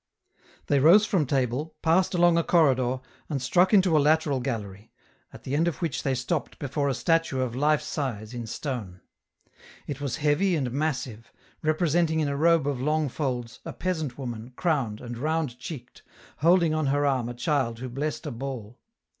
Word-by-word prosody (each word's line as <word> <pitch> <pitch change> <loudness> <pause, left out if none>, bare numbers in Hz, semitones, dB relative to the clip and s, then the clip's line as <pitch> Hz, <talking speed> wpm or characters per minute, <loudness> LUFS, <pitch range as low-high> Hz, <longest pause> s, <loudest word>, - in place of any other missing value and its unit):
They 140 - +2
rose 175 +9 +7
from 180 -9 +1
table, 135 +4 -1
passed 180 +3 +3
along 175 -1 +5
a 170 - +2
corridor, 130 -7 +2 0.3
and 145 -3 -1
struck 180 +8 +3
into 185 -5 +4
a - - +6
lateral 150 -2 +2
gallery, 110 -5 -5 0.4
at - - -13
the 135 - -2
end 165 +3 +2
of 170 - -2
which 165 -6 -2
they 135 -1 0
stopped 135 +5 -3
before 140 0 -1
a 135 - 0
statue 165 -3 +1
of 125 -2 -2
life 150 +2 +2
size, 120 -8 -4
in 120 -2 -5
stone. 110 -8 -5 0.8
It 145 -1 -6
was 140 -2 -2
heavy 160 +5 +2
and 130 -6 -1
massive, 130 -5 -3 0.3
representing 160 0 +1
in 155 - +1
a 140 - -1
robe 165 0 +3
of 140 -3 -2
long 150 +1 +1
folds, 120 -5 -3
a - - -6
peasant 160 -9 -3
woman, 120 -2 -6
crowned, 135 -12 -1
and 120 -1 -7
round 155 -4 -1
cheeked, 135 -1 -9 0.4
holding 170 0 +4
on 155 -2 0
her 145 +1 +1
arm 130 -4 +1
a 120 - -6
child 125 -2 0
who 130 +2 -6
blessed 145 +6 -4
a 150 - -3
ball. 120 -2 -6
140 Hz, 180 wpm, -26 LUFS, 125-160 Hz, 0.8 s, rose